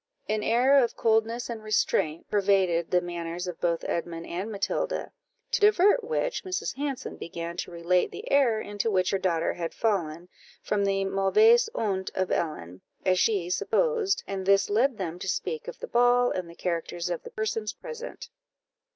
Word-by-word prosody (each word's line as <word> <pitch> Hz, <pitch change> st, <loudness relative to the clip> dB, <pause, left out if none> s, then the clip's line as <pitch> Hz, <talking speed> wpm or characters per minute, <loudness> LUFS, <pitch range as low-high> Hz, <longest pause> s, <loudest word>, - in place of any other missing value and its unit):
An 215 Hz, 0 st, 0 dB
air 255 Hz, +5 st, +4 dB
of 235 Hz, -, -2 dB
coldness 225 Hz, +1 st, +1 dB
and 230 Hz, -2 st, -6 dB
restraint 170 Hz, -7 st, 0 dB
pervaded 190 Hz, -4 st, +2 dB
the 180 Hz, -, +3 dB
manners 175 Hz, 0 st, -5 dB
of 180 Hz, -2 st, -7 dB
both 170 Hz, -1 st, 0 dB
Edmund 170 Hz, -1 st, -3 dB
and 190 Hz, +6 st, -4 dB
Matilda, 200 Hz, -2 st, -2 dB, 0.4 s
to -, -, +1 dB
divert 415 Hz, +2 st, +5 dB
which, 480 Hz, +2 st, -2 dB
Mrs. 370 Hz, -1 st, -3 dB
Hanson 275 Hz, -1 st, -4 dB
began 170 Hz, 0 st, -6 dB
to -, -, -4 dB
relate 175 Hz, +1 st, +1 dB
the 445 Hz, +4 st, -8 dB
error 250 Hz, -6 st, +4 dB
into 205 Hz, +1 st, -2 dB
which 185 Hz, -3 st, +1 dB
her 195 Hz, -, +1 dB
daughter 170 Hz, -3 st, 0 dB
had 170 Hz, -1 st, -5 dB
fallen, 175 Hz, -6 st, -1 dB, 0.4 s
from 205 Hz, -1 st, 0 dB
the 195 Hz, 0 st, +1 dB
mauvaise 435 Hz, -, +4 dB
honte 190 Hz, -3 st, -1 dB
of 185 Hz, -1 st, -1 dB
Ellen, 90 Hz, -, -3 dB, 0.2 s
as 185 Hz, -1 st, +3 dB
she 200 Hz, -6 st, +2 dB
supposed, 455 Hz, -, +1 dB
and 195 Hz, -1 st, -4 dB
this 195 Hz, 0 st, +4 dB
led 240 Hz, +3 st, +2 dB
them 175 Hz, -3 st, -4 dB
to 195 Hz, -, -6 dB
speak 465 Hz, -, -3 dB
of -, -, -7 dB
the 485 Hz, -, -6 dB
ball, 245 Hz, -, +4 dB
and 180 Hz, -2 st, -3 dB
the 170 Hz, -, -12 dB
characters 170 Hz, 0 st, -3 dB
of 175 Hz, -, -3 dB
the -, -, -10 dB
persons 215 Hz, 0 st, -2 dB
present. 480 Hz, 0 st, -9 dB
200 Hz, 175 wpm, -27 LUFS, 175-245 Hz, 0.4 s, divert